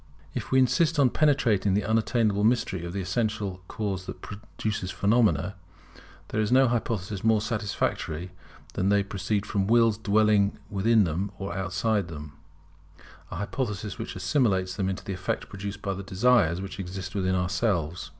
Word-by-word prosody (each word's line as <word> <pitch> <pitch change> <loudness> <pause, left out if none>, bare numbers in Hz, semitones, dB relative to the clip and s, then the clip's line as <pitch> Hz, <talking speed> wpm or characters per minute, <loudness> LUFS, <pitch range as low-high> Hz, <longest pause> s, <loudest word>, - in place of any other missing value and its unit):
If - - -4
we 130 - +3
insist 130 +6 +3
upon 135 -4 +4
penetrating 115 -10 +2
the 105 - +1
unattainable 110 -2 +1
mystery 110 -6 +1
of 85 - -5
the 100 +2 -3
essential 100 -1 -2
Cause 95 -4 -3
that - - -7
produces 105 -2 -4
phenomena, 100 -2 +2 0.8
there 110 - 0
is 105 - -1
no 130 +1 +6
hypothesis 110 -4 -2
more 110 -1 +4
satisfactory 105 -6 -2 0.4
than 95 - 0
that 100 - +4
they 100 - +3
proceed 100 +1 -2
from 100 -2 -1
Wills 115 -1 +4
dwelling 105 -1 +3 0.2
in 110 +2 +4
them 90 +4 -1
or 95 -3 -5
outside 95 +1 0
them; 75 -3 -8 1.0
an - - -6
hypothesis 105 -1 -3
which - - -5
assimilates 95 -3 +1
them 95 -2 -1
to - - -11
the 100 - -3
effect 90 0 -3
produced 100 0 -6
by 100 - -1
the 95 - -6
desires 95 -3 +2
which 95 0 -7
exist 95 0 -5
within 95 -2 0
ourselves. 90 -3 -1
100 Hz, 160 wpm, -27 LUFS, 95-110 Hz, 1.0 s, no